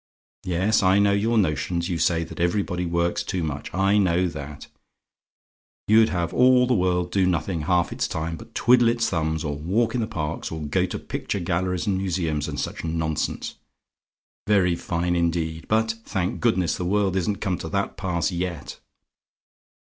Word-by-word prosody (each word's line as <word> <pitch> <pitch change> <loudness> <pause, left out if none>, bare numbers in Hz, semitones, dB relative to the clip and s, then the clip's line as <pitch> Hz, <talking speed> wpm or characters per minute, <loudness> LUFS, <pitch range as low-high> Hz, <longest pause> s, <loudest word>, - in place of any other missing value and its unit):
Yes, 95 +5 +2
I 95 0 +4
know 100 0 +4
your 110 +3 +1
notions; 85 -1 0
you 85 -3 -2
say 85 +1 +2
that 80 - -10
everybody 90 0 0
works 85 0 0
too 90 -3 -3
much: 75 -2 -4
I 95 +2 +2
know 90 -1 +2
that. 75 -2 -8 1.2
You'd 110 +1 +5
have 85 -2 -2
all 125 0 +5
the 125 - +1
world 90 -3 +1
do 95 -1 +2
nothing 85 -1 -1
half 90 +2 +1
its - - -1
time 80 0 -3
but 115 +5 -13
twiddle 120 0 +5
its 115 0 +1
thumbs, 80 -2 -1
or 75 -2 -2
walk 100 +10 0
in 125 - 0
the 110 - -1
parks, 80 -5 -4
or 80 -1 -5
go 75 - 0
to - - -4
picture 100 - -4
galleries, 90 0 -1
and 95 -2 0
museums, 85 -6 -1
and - - -4
such - - -4
nonsense. 80 -1 -2 0.9
Very 95 -4 +3
fine, 85 +1 -1
indeed; 80 -1 -1
but, 110 +1 +2
thank 95 -4 -2
goodness! 95 -9 +1
the - - -3
world 95 0 +1
isn't 95 +2 0
come 95 -2 -2
to 80 - -5
that 100 +4 -2
pass 90 -3 -1
yet. 85 -4 -4
90 Hz, 175 wpm, -24 LUFS, 85-100 Hz, 1.2 s, You'd